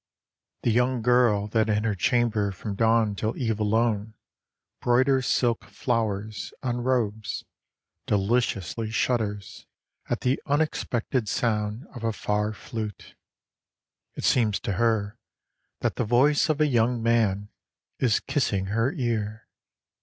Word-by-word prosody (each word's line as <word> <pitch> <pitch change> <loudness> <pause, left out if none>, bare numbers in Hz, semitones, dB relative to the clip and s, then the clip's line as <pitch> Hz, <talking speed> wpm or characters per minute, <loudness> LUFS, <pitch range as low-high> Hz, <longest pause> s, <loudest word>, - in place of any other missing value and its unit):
THE 120 - +2
young 125 +1 +1
girl 120 -4 +4
that 110 0 +1
in 105 0 +1
her 115 -2 +1
chamber 105 0 +1
from 100 +3 -5
dawn 110 0 +3
till 110 +3 -2
eve 110 -4 -1
alone 110 0 +1 0.7
Broiders 130 +1 +3
silk 120 -3 +1
flowers 105 -2 -2
on 120 -2 -1
robes, 120 -4 -1 0.6
deliciously 110 0 0
shudders 110 -3 -2 0.4
At - - -1
the 130 +2 +1
unexpected 130 -6 0
sound 105 +2 -1
of 120 -3 -8
a 115 -1 0
far 105 0 -1
flute; 110 -1 -7 1.0
It - - -6
seems 110 -5 +3
to - - -2
her 110 +1 0 0.6
that - - -1
the - - +1
voice 135 +8 +3
of 155 -1 +1
a 155 - +5
young 120 -3 +1
man 105 -4 +1 0.5
is 115 -4 +3
kissing 100 -10 0
her 115 +4 +2
ear. 115 - -2
115 Hz, 125 wpm, -26 LUFS, 105-120 Hz, 1.0 s, a